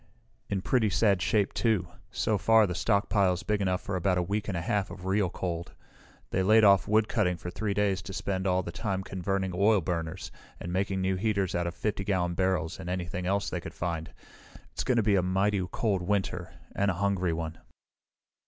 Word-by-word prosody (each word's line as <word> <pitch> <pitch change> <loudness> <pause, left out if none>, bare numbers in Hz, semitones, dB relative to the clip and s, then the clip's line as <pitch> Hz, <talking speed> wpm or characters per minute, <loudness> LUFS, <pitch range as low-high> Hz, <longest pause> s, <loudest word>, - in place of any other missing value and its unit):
"In 95 -2 -2
pretty 115 -5 +2
sad 100 0 +2
shape, 100 0 +1
too. 110 -7 +1 0.2
So 105 -2 0
far, 110 +1 +5
the 90 - -2
stockpile 100 -1 +2
is 90 +2 -5
big 105 -1 0
enough 95 -1 0
for 100 - -4
about 90 0 +1
a 90 - +1
week 105 +4 -2
and 95 -5 -2
a - - -2
half 100 +3 -1
of 90 - -9
real 95 -1 +1
cold. 85 -1 -4 0.6
They 95 - +1
laid 110 +4 +5
off 100 -2 +6
woodcutting 105 -4 +2
for 90 +2 -6
three 100 +1 -2
days 100 -2 +1
to 95 - -8
spend 95 -1 -2
all 90 0 +2
the 85 - -6
time 95 0 -3
converting 95 0 -2
oil 100 +3 +4
burners, 80 -2 -4 0.3
and 85 - -5
making 95 0 0
new 95 0 0
heaters 100 -2 0
out 85 0 0
of 85 - -5
50 100 +2 -2
gallon 90 -3 0
barrels 90 -2 0
and 90 -2 -6
anything 90 0 -3
else 100 +1 0
they - - -3
could - - -9
find. 85 -2 -3 0.6
It's - - -3
going 130 - +1
to 115 - +3
be 100 -1 +3
a - - +3
mighty 95 +2 +1
cold 100 -5 0
winter 100 +2 -1 0.2
and 100 0 +2
a 95 - 0
hungry 95 -2 0
one." 80 0 -4
95 Hz, 210 wpm, -29 LUFS, 90-100 Hz, 0.6 s, off